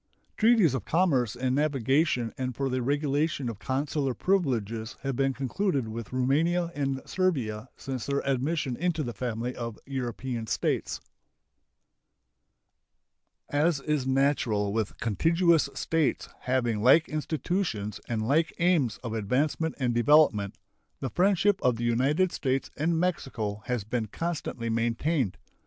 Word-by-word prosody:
Treaties 220 - +4
of 130 - -2
commerce 140 - +2
and 125 +1 -1
navigation 135 -3 +1
and 130 -3 -3
for 135 +1 -1
the 130 0 -1
regulation 145 0 0
of 110 -4 -7
consular 135 0 -1
privileges 115 - 0
have 135 -2 -2
been 135 +1 +2
concluded 135 - -1
with 115 0 -6
Roumania 160 +7 +1
and 135 -3 -2
Servia 130 - -1
since 130 -4 -5
their 140 0 -1
admission 135 0 0
into 165 +1 -1
the 120 -3 -4
family 120 +1 -3
of 115 -2 -5
European 125 -3 -4
States. - - -1 2.5
As 150 +1 +2
is 145 -2 -1
natural 130 -7 +1
with 110 -2 -2
contiguous 165 - +2
states 165 -3 0 0.2
having 120 -4 +1
like 135 +8 +6
institutions 155 - -2
and 110 -2 -1
like 160 +5 +2
aims 160 - +2
of 115 -3 -4
advancement 140 +9 0
and 125 -3 0
development, 120 -6 +4 0.4
the 135 - -3
friendship 195 +1 +3
of 125 -2 +3
the 115 - -5
United 135 +10 +2
States 135 -1 -1
and 160 +2 +1
Mexico 120 - -2
has 125 -4 -1
been 110 +1 -2
constantly 150 -3 -4
maintained. 115 - 0
135 Hz, 130 wpm, -28 LUFS, 115-155 Hz, 2.5 s, like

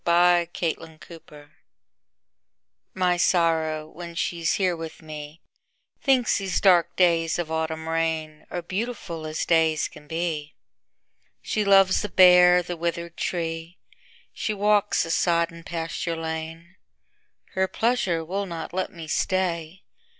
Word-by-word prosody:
My 175 0 +4
November 165 -1 -3 0.2
Guest 145 -2 -16 1.5
MY 180 -1 +2
Sorrow, 160 -3 +1
when 170 +1 -9
she's 170 -1 -1
here 185 -3 +1
with 165 0 -8
me, 150 +1 -9 0.6
Thinks 255 -6 +2
these 195 -2 -1
dark 180 -4 +4
days 165 -3 +2
of 170 -2 -3
autumn 160 0 -2
rainAre 160 +1 -3
beautiful 190 -6 -4
as 155 0 -3
days 160 -2 +2
can 150 - -15
be; 160 -2 -3 0.9
She 215 - -1
loves 195 -1 +5
the 210 - -4
bare, 180 -1 +7
the 175 0 -5
withered 170 0 -3
tree; 165 0 -4 0.6
She 215 - -3
walks 205 0 +2
the 165 - -4
sodden 170 -1 +1
pasture 165 0 -3
lane. 160 +1 -6 0.8
Her 190 0 +1
pleasure 190 -6 0
will 195 +4 -3
not 165 -2 -6
let 185 0 -2
me 165 -3 -9
stay. 175 +1 -1
170 Hz, 125 wpm, -25 LUFS, 160-180 Hz, 1.5 s, bare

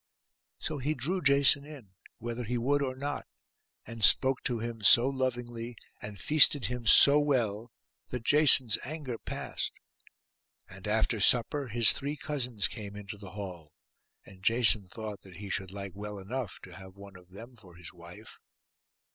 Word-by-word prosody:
So 155 -2 -5
he 150 +4 -2
drew 175 +9 -2
Jason 140 -1 +4
in, 140 -10 -13 0.3
whether 120 +1 -6
he 120 +2 -3
would 140 +5 0
or 130 -2 -3
not, 145 +2 -5 0.6
and 115 -2 -6
spoke 130 +5 +5
to 120 - 0
him 115 0 -6
so 120 +4 +6
lovingly 120 -3 -4 0.3
and 105 -1 -8
feasted 145 - +4
him 120 +2 -5
so 140 +8 +8
well, 120 -6 -1 0.4
that 125 -2 -6
Jason's 135 -6 +5
anger 140 -5 -6
passed; - - -5 1.0
and 95 +1 -10
after 110 +1 0
supper 125 +6 +2
his 115 -1 +4
three 145 +2 -5
cousins 125 -10 -2
came 100 -3 -9
into 100 0 -9
the 95 -3 -12
hall, 90 -6 -9 0.5
and 95 -1 -16
Jason 110 -2 +2
thought 105 0 -8
that 95 -2 -15
he 100 +2 -8
should 95 -2 -3
like 100 0 -8
well 105 +1 -8
enough 105 +2 -6
to 90 - -13
have 95 +1 -13
one 100 -1 -14
of 90 -1 -17
them 115 +6 -13
for 95 -6 -18
his 90 -1 -11
wife. 90 +5 -14
115 Hz, 165 wpm, -29 LUFS, 100-130 Hz, 1.0 s, so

